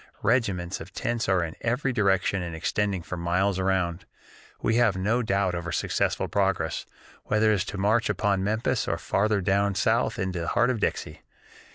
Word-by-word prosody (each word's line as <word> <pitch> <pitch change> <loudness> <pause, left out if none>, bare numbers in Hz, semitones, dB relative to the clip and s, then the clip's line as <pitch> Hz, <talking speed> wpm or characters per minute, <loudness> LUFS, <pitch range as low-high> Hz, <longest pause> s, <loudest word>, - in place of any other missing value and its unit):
Regiments 100 -6 0
of 85 +4 -9
tents 115 0 -2
are 95 -2 +3
in 80 -1 -4
every 125 +3 0
direction 100 -3 +1
and 85 -2 -5
extending 95 +2 -1
for 90 - -6
miles 90 +3 0
around. 95 -2 -1 0.5
We 115 - +1
have 110 -5 +3
no 105 +6 +1
doubt 100 -4 0
of 85 -1 -4
our - - -3
successful - - 0
progress, 95 -6 -1 0.4
whether 110 +1 +3
it - - +4
is 95 -2 0
to 105 - -6
march 110 +5 +2
upon 100 -3 +1
Memphis 110 +4 0
or 85 - 0
farther 100 +4 +1
down 100 +1 +1
South 110 +5 +1
into 95 -4 -2
the 85 - -3
heart 120 +1 +2
of 120 - -2
'Dixie.' - - -2
100 Hz, 185 wpm, -26 LUFS, 90-110 Hz, 0.5 s, it